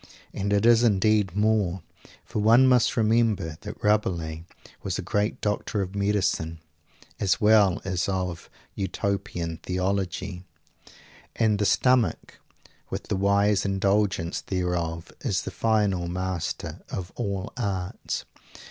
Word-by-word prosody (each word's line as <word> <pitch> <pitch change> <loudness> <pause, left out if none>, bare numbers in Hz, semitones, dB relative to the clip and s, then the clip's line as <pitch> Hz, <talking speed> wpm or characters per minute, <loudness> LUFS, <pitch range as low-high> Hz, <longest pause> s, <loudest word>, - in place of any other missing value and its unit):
And 100 +1 -2
it 100 +1 +2
is 120 -1 +6
indeed 105 -3 +2
more, 105 -4 +1 0.4
for - - -3
one 115 +5 +6
must 125 -2 +3
remember 110 -8 +1
that 105 0 -9
Rabelais 85 -6 0 0.4
was 95 -2 -3
a 95 - -4
great 105 +4 -1
doctor 105 0 -1
of 95 +1 -7
medicine, 100 -5 0 0.6
as 95 - +1
well 105 -4 +5
as 90 0 -1
of 90 -3 -3 0.2
Utopian 95 -4 -3
Theology 95 0 -2 0.9
and 110 -2 +2
the 105 - +1
stomach, 115 0 +2 0.5
with - - -5
the - - +1
wise 100 +1 +2
indulgence 95 -3 0
thereof, 90 -3 -2
is - - -1
the - - -5
final 105 -6 +1
master 90 -1 -3
of 95 -1 -5
all 100 -5 -3
arts! 95 -6 -3
100 Hz, 120 wpm, -26 LUFS, 90-105 Hz, 0.9 s, is